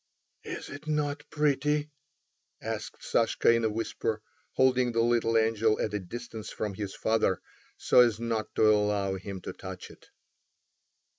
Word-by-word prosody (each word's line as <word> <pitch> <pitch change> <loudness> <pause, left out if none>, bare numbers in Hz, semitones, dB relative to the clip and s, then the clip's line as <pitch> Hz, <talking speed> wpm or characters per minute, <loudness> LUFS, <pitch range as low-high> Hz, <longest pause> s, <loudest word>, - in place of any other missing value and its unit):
"Is - - -6
it 145 +2 -9
not 145 -1 -1
pretty?" 150 0 +1 0.7
asked - - -5
Sashka 115 0 +3
in 115 0 +1
a 110 - +2
whisper, 110 0 -2 0.3
holding 130 -2 +3
the 115 - +2
little 115 -1 +2
angel 110 -1 +2
at 105 - -1
a 105 - 0
distance 110 +3 -7
from 105 -2 -3
his 100 0 -5
father, 110 -4 +1 0.4
so - - +4
as 120 -3 +5
not 115 -2 -2
to - - +3
allow 105 -2 +2
him 95 0 -6
to - - -6
touch 95 -1 -8
it. - - -18
115 Hz, 150 wpm, -29 LUFS, 105-125 Hz, 0.7 s, as